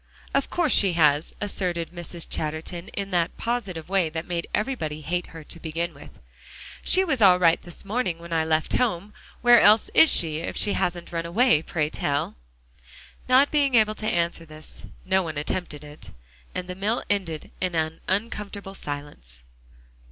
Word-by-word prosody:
"Of 275 0 +1
course 345 -5 +1
she 195 -3 +3
has," 150 -2 +3
asserted 180 -5 -1
Mrs. 175 -1 -6
Chatterton, 160 +4 -4
in 200 -1 -5
that 170 -2 0
positive 200 -9 -3
way 190 -3 +1
that 160 +1 -5
made 170 -2 -3
everybody 180 - -2
hate 175 +4 -2
her 160 -1 -10
to 170 - -8
begin 165 +1 -3
with. - - -14 0.7
"She 375 - +4
was 285 -10 -1
all 185 -3 +7
right 170 -2 +4
this 175 +3 -10
morning 200 -5 -1
when 170 0 -8
I 160 -1 +2
left 160 0 0
home. 210 -4 0 0.3
Where 240 -1 +7
else 210 +1 +6
is 320 - +7
she, 160 -3 +1
if 165 - -4
she 205 - +2
hasn't 175 -1 -2
run 165 0 -3
away, 200 - +4
pray 155 -2 -2
tell?" 145 0 -1 0.9
Not 265 +3 +5
being 280 -4 +2
able 215 -2 +4
to 215 0 -5
answer 170 -1 0
this, 155 -1 -12 0.2
no 190 0 +2
one 160 -4 -5
attempted 150 0 -3
it, 145 -9 -11 0.5
and 180 - -3
the 180 - -4
meal 205 +5 -1
ended 185 -7 -2
in 185 -2 -1
an 160 0 -1
uncomfortable 200 -1 -3
silence. 145 - -8
175 Hz, 175 wpm, -25 LUFS, 160-205 Hz, 0.9 s, all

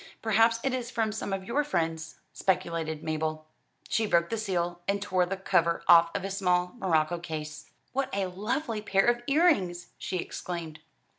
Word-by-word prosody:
"Perhaps 225 +1 +4
it 270 - 0
is 245 -2 -3
from 225 -3 0
some 210 -2 -4
of 195 -1 -2
your 285 +8 +1
friends," 165 - -2
speculated 165 -4 -1
Mabel. 155 0 -2 0.4
She 220 -1 +1
broke 170 -1 +2
the 225 - 0
seal, 175 -4 -2
and 200 +1 +1
tore 185 -3 +1
the 195 +1 -3
cover 170 -3 +1
off 170 -1 +8
a 195 - -2
small 180 -2 +1
morocco 170 -3 +1
case. 155 -2 -6 0.2
"What 270 0 0
a 195 -1 0
lovely 215 +5 -2
pair 195 -2 +2
of 240 0 +2
earrings!" 275 - +2
she 185 - -3
exclaimed. 170 -3 -5
185 Hz, 165 wpm, -28 LUFS, 170-220 Hz, 0.4 s, off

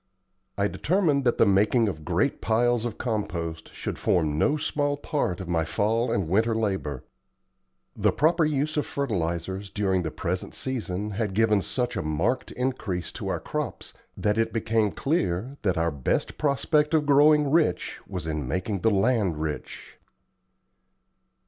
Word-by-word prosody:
I 100 0 +2
determined 150 - +1
that 120 - +2
the - - +5
making 105 +4 +3
of 80 -6 -4
great - - 0
piles 120 +1 +2
of 115 -3 -4
compost 85 -8 -3
should - - -5
form 80 -4 +1
no 145 - +2
small 145 -1 -1
part 140 - -2
of 95 - -6
my 85 -2 +1
fall 110 +8 0
and 95 -5 0
winter 110 +6 +2
labor. 95 - -2 0.9
The - - +2
proper 165 +2 +3
use 150 0 0
of 150 - 0
fertilizers 95 -6 -2
during 95 -3 0
the 80 - -2
present 90 +3 -3
season 105 -6 -3
had 100 -2 -2
given 105 -2 +3
such 110 +6 -2
a 95 - -1
marked 85 +11 -1
increase 110 -9 -2
to - - -6
our - - -1
crops - - -5 0.2
that 105 +1 +1
it 115 - +1
became 110 -1 +1
clear 120 - -1
that 95 -5 0
our 85 0 +1
best 70 -4 -1
prospect 150 +2 +2
of 150 -2 +2
growing 145 0 +5
rich 155 - +1
was 90 -5 -5
in 75 -4 -3
making 95 - -2
the 115 - +3
land 100 -4 +2
rich. 75 -1 -5
105 Hz, 155 wpm, -26 LUFS, 90-130 Hz, 0.9 s, the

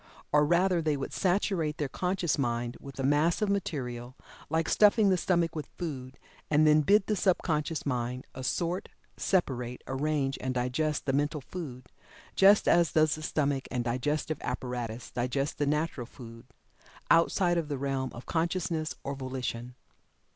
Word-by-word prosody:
Or 150 0 +4
rather, 175 +1 +3
they 155 -2 0
would 135 - -5
saturate 180 -5 0
their 150 -4 -1
conscious 180 +1 -1
mind 120 -2 -1
with 140 -1 -11
a - - -1
mass 150 +5 +3
of 210 - 0
material, 130 -11 -3 0.3
like 160 +1 +1
stuffing 210 -1 +5
the - - +4
stomach 170 -3 +1
with 150 -3 -5
food, 135 -6 -5 0.3
and 155 +1 +4
then 155 0 +6
bid 200 +6 +4
the 215 - 0
subconscious 165 -5 0
mind 125 -1 -2
assort, 170 +8 -2 0.3
separate, 125 -9 -1
arrange 135 0 -1
and 130 0 -2
digest 125 +5 -1
the 135 - 0
mental 145 +2 0
food, 130 -5 -7 0.5
just 200 +2 +6
as 170 -1 +4
does 155 -1 +4
the 155 - -5
stomach 140 -3 -1
and 125 -1 -1
digestive 145 +5 -1
apparatus 125 -2 -4
digest 130 +4 -2
the 145 - +1
natural 150 -4 -1
food 115 -3 -12 0.6
outside 175 +1 +4
of 160 - -3
the 145 -2 -3
realm 135 -1 -2
of 120 - -9
consciousness 165 -1 -1
or 140 - -3
volition. 125 -2 -5
150 Hz, 155 wpm, -29 LUFS, 130-170 Hz, 0.6 s, then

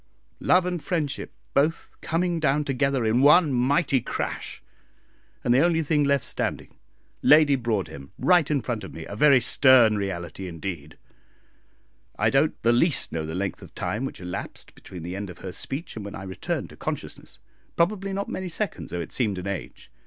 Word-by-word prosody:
Love 180 0 +3
and 180 -3 -3
friendship 160 -6 -2 0.2
both 150 +4 0
coming 170 +1 0
down 150 -1 +2
together 135 -3 0
in 115 +3 +2
one 150 +1 +6
mighty 135 +2 +2
crash, - - -4 0.8
and 120 - +3
the 125 - +5
only 165 +1 +3
thing 150 0 +2
left 140 -3 +1
standing - - -3 0.4
Lady 150 -1 +6
Broadhem 95 - -3
right 175 -5 +3
in 145 -3 +1
front 115 -4 -4
of 95 - -8
me 80 - -7
a 100 - -7
very 140 +3 +6
stern 125 -2 +5
reality 95 -2 -5
indeed. 85 -3 -6 1.2
I - - +2
don't - - +2
the 115 - +4
least 140 +6 +3
know 80 -1 -3
the 80 - -5
length 95 +1 -3
of - - -14
time 110 +4 -2
which - - -6
elapsed 90 -1 -7
between 90 -3 -11
the 90 +2 -5
end 100 0 -5
of 90 - -10
her 95 - -6
speech 135 - -4
and 110 - -6
when 100 - -7
I 95 - -7
returned 95 -1 -4
to - - -12
consciousness - - -6 0.4
probably 195 +3 0
not 200 +1 -3
many 185 -1 -4
seconds, 210 +4 -4
though 90 - -3
it 85 - -7
seemed 105 -7 0
an 90 - -6
age. 100 -1 -6
130 Hz, 180 wpm, -25 LUFS, 95-155 Hz, 1.2 s, one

